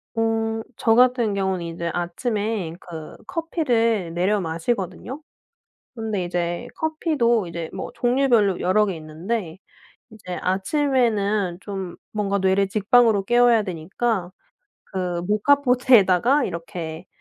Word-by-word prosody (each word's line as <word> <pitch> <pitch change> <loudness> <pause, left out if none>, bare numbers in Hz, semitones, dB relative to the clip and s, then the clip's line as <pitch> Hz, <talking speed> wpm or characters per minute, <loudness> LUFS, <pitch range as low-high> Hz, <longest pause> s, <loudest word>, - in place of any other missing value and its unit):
어. 225 0 0 0.2
저 225 -1 +3
같은 245 -4 +4
경우는 190 -3 -1
이제 170 0 -4
아침에 200 0 -2
그 160 -3 -9
커피를 230 - 0
내려 195 +4 +1
마시거든요. 185 - -3 0.7
근데 220 -5 -2
이제 175 +6 -2
커피도 295 - +1
이제 170 -1 -5
뭐 - - -5
종류별로 240 -6 +2
여러 210 +3 +3
개 190 - -2
있는데 165 +4 -4 0.5
인제 195 -5 -8
아침에는 205 - +1
좀 195 -3 -6 0.2
뭔가 200 -2 -1
뇌를 190 +1 +2
직방으로 215 0 +3
깨워야 240 -2 +4
되니까 185 +2 -2 0.5
그 180 -2 -3
모카포트에다가 250 +1 +4
이렇게 165 -1 -6
205 Hz, 260 characters per minute, -23 LUFS, 180-235 Hz, 0.7 s, 같은